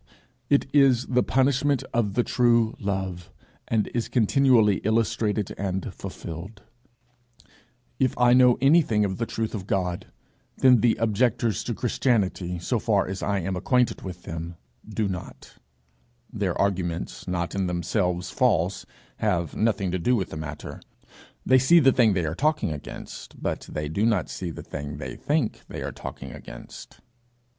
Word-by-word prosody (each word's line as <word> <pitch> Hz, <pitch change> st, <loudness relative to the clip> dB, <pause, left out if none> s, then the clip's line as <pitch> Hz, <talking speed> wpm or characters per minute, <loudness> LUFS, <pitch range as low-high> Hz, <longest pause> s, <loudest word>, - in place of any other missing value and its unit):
It 140 Hz, -, +3 dB
is 135 Hz, -4 st, +5 dB
the 125 Hz, 0 st, +2 dB
punishment 135 Hz, +1 st, +2 dB
of 105 Hz, -4 st, 0 dB
the 120 Hz, -, +3 dB
true 120 Hz, -2 st, +3 dB
Love, 95 Hz, -4 st, -3 dB, 0.4 s
and 110 Hz, -2 st, +1 dB
is 120 Hz, -1 st, -1 dB
continually 120 Hz, -4 st, +4 dB
illustrated 110 Hz, -1 st, 0 dB
and 95 Hz, -1 st, -3 dB
fulfilled: 95 Hz, +6 st, -8 dB, 1.4 s
if 130 Hz, -2 st, +1 dB
I 125 Hz, 0 st, +5 dB
know 125 Hz, -1 st, +6 dB
anything 135 Hz, -7 st, +4 dB
of 95 Hz, -1 st, -3 dB
the 115 Hz, -, -2 dB
truth 110 Hz, -1 st, -3 dB
of 100 Hz, -4 st, -5 dB
God, 90 Hz, -3 st, -1 dB, 0.5 s
then 125 Hz, -4 st, +5 dB
the 120 Hz, 0 st, +4 dB
objectors 115 Hz, -1 st, +1 dB
to -, -, -2 dB
Christianity, 95 Hz, -7 st, 0 dB
so 110 Hz, +8 st, -1 dB
far 105 Hz, -3 st, +2 dB
as 95 Hz, +1 st, -5 dB
I 100 Hz, -1 st, 0 dB
am 95 Hz, +2 st, -2 dB
acquainted 125 Hz, +6 st, +1 dB
with 90 Hz, -2 st, -8 dB
them, 85 Hz, +1 st, -6 dB, 0.3 s
do 110 Hz, 0 st, -1 dB
not; 90 Hz, -2 st, -8 dB, 0.8 s
their -, -, -2 dB
arguments, 90 Hz, -4 st, -2 dB
not 90 Hz, -1 st, -2 dB
in 95 Hz, -2 st, -1 dB
themselves 90 Hz, 0 st, -1 dB
false, 100 Hz, -, +1 dB, 0.3 s
have 85 Hz, -7 st, -1 dB
nothing 100 Hz, -4 st, +1 dB
to 95 Hz, -, -1 dB
do 125 Hz, +9 st, +2 dB
with 95 Hz, -5 st, -2 dB
the -, -, -6 dB
matter; 75 Hz, -2 st, -7 dB, 0.6 s
they 130 Hz, 0 st, +5 dB
see 170 Hz, +7 st, +6 dB
the 135 Hz, -4 st, +5 dB
thing 115 Hz, -5 st, +4 dB
they 90 Hz, -3 st, 0 dB
are 75 Hz, -, -2 dB
talking 150 Hz, -, 0 dB
against, 75 Hz, -2 st, -8 dB
but -, -, -3 dB
they 75 Hz, -1 st, -3 dB
do 90 Hz, +8 st, -1 dB
not 105 Hz, -7 st, 0 dB
see 90 Hz, -, -4 dB
the 80 Hz, -, -8 dB
thing 75 Hz, -1 st, -6 dB
they -, -, -6 dB
think 145 Hz, -6 st, -1 dB
they -, -, -6 dB
are -, -, -4 dB
talking 70 Hz, -1 st, -8 dB
against. -, -, -11 dB
105 Hz, 155 wpm, -25 LUFS, 90-120 Hz, 1.4 s, know